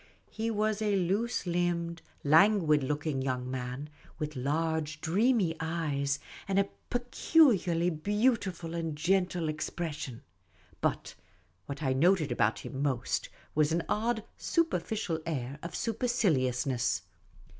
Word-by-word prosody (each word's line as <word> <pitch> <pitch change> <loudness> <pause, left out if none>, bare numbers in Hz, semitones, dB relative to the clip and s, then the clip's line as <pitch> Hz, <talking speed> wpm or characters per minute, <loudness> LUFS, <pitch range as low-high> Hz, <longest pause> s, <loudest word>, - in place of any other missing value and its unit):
He 225 +1 -2
was 215 -1 0
a 210 -2 +2
loose 195 +7 0
limbed, 170 -1 -1 0.2
languid 160 0 +5
looking 145 0 -1
young 130 -1 -2
man, 125 +2 -4 0.3
with 150 0 -4
large, 155 +3 -1
dreamy 195 0 +2
eyes, 150 -4 -1 0.3
and 195 -1 0
a 200 0 +3 0.2
peculiarly 240 - +3
beautiful 195 -1 0
and 165 -2 -2
gentle 180 0 +1
expression; 155 -5 -4 0.6
but - - -1 0.5
what 140 +2 -5
I 130 -2 +2
noted 160 +2 +3
about 105 +2 +2
him 135 - -5
most 130 -4 -1 0.2
was 155 0 +3
an 165 +1 +1
odd 220 +1 0 0.2
superficial 210 - 0
air 140 -3 -3
of 170 - -6
superciliousness. 135 - +1
165 Hz, 115 wpm, -30 LUFS, 145-200 Hz, 0.6 s, languid